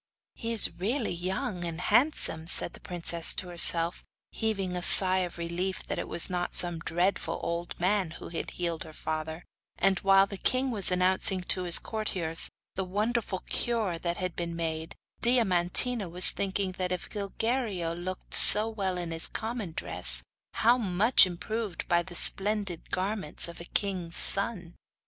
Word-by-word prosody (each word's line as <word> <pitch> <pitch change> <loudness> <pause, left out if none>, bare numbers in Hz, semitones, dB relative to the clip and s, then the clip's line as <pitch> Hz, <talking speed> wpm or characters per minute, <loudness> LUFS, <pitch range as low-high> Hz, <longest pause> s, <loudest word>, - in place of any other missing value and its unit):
'He 230 - -5
is 220 -6 +3
really 230 +6 -1
young 180 +1 -3
and 165 -1 -4
handsome,' 210 - +1
said 170 - -4
the - - -13
princess 170 -1 -1
to 180 - -5
herself, 170 0 +1 0.3
heaving 195 -5 -3
a 180 - -4
sigh 185 +1 +7
of 180 -2 -5
relief 170 +2 -4
that - - -5
it - - -5
was 170 - 0
not 180 -1 -4
some 175 -2 +5
dreadful 175 +4 -2
old 170 +1 -5
man 190 0 0
who - - -10
had 165 - -5
healed 170 -2 -4
her 155 - -13
father; 160 +2 -6 0.3
and 195 -1 +1
while 195 0 +4
the 200 -1 -9
king 255 +1 0
was 205 -5 +1
announcing 185 +1 0
to 185 +1 +2
his 175 - +8
courtiers 185 -7 0 0.2
the 190 - -4
wonderful 210 +1 -3
cure 220 -8 -2
that 170 0 -3
had 185 -2 -4
been 170 -1 -5
made, 160 -1 -4 0.3
Diamantina 225 -1 +1
was 180 +2 0
thinking 195 -1 -3
that 180 -1 -2
if 180 - -4
Gilguerillo 205 -3 -3
looked 180 +2 -8
so 210 +1 +8
well 195 -5 -4
in 175 -2 -6
his 165 0 0
common 220 -5 -6
dress, - - +2 0.3
how 240 +3 +2
much 205 +1 +4
improved 205 +2 -6
by 175 0 +1
the 175 0 -9
splendid 195 -2 +1
garments 190 -4 -1
of 170 0 -10
a - - -9
king' 185 -3 -3
son. 185 -1 +5
185 Hz, 165 wpm, -27 LUFS, 170-205 Hz, 0.3 s, his